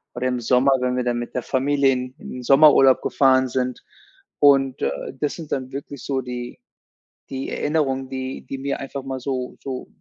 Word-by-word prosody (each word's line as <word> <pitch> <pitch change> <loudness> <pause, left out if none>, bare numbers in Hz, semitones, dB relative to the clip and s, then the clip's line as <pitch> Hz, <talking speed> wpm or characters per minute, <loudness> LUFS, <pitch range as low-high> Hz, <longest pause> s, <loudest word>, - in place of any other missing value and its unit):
oder 120 +1 -3
im 125 -1 -1
Sommer, 125 +3 +3
wenn 125 0 0
wir 125 - 0
dann 120 -1 -1
mit 120 - -7
der 125 - -1
Familie 140 +1 +2
in 125 0 -3
in - - -10
den 125 - -7
Sommerurlaub 135 0 +6
gefahren 130 -1 +3
sind. 125 0 -2 0.6
Und, 135 -2 +4
äh, - - +1 0.3
das 150 - -1
sind 160 -3 -9
dann 130 -1 -3
wirklich 140 0 -7
so 135 -2 -1
die 125 -1 -7 0.7
die 135 0 -4
Erinnerungen, 135 -4 -1
die 130 0 -5
die 135 - -4
mir 140 +1 -3
einfach 135 0 -6
mal 135 -1 -4
so 130 -1 -4
so 130 -2 -5
130 Hz, 190 wpm, -22 LUFS, 125-135 Hz, 0.7 s, Sommerurlaub